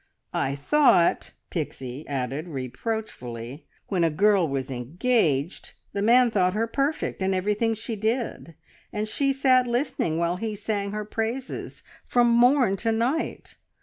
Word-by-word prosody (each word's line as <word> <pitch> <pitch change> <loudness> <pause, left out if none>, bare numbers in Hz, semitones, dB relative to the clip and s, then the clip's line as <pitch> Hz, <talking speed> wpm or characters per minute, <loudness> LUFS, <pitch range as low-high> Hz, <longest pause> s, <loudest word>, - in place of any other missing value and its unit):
I 135 +1 0
thought," 175 - +3 0.2
Pixie 135 -3 -5
added 135 +3 -3
reproachfully, 130 - -5 0.2
"when 185 -4 +1
a 165 - +4
girl 195 +2 +3
was 135 -2 -3
engaged 155 - 0 0.2
the 200 - -2
man 240 +3 +5
thought 185 -2 +2
her 225 +2 +1
perfect, 275 0 -2
and 190 0 +1
everything 210 +4 0
she 225 +1 -5
did, 220 -5 -2 0.4
and 215 +1 -2
she 275 +5 +1
sat 260 -2 +3
listening 240 - -1
while 170 +1 0
he 215 +2 -3
sang 205 -1 -2
her 210 0 -4
praises 225 +5 -4 0.2
from 240 -1 +3
morn 245 -3 +4
to 225 +4 0
night. 240 +8 -2
210 Hz, 140 wpm, -25 LUFS, 160-235 Hz, 0.4 s, man